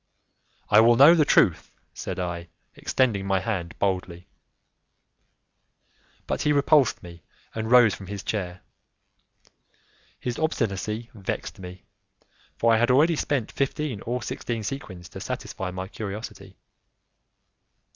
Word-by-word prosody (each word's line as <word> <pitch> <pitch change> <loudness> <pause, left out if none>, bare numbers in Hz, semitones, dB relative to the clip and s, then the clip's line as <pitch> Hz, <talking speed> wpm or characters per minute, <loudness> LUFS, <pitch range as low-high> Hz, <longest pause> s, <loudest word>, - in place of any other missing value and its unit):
"I 105 - +8
will 115 +2 +6
know 140 +7 +8
the 160 -3 +4
truth," 85 - +3 0.2
said - - -5
I, 85 -1 -4 0.3
extending 110 -7 0
my 95 -1 +2
hand 95 -5 -4
boldly. 90 -3 -2 2.0
But - - -2
he 150 - +2
repulsed 145 -2 +3
me 85 -1 -11 0.3
and 110 0 -3
rose 120 -4 +6
from 95 - -9
his 100 0 -6
chair. 95 -4 -4 1.6
His 120 -2 -4
obstinacy 115 - -2
vexed 100 -4 -5
me, 90 0 -10 0.7
for 115 0 +3
I 110 - +4
had 120 - +2
already 150 +6 +4
spent 140 -6 -1
fifteen 140 -5 -2
or 125 +1 -3
sixteen 115 -2 -4
sequins 95 -9 -6
to - - -9
satisfy 95 - -5
my 95 +1 -5
curiosity. 105 +2 -7
110 Hz, 125 wpm, -25 LUFS, 95-125 Hz, 2.0 s, I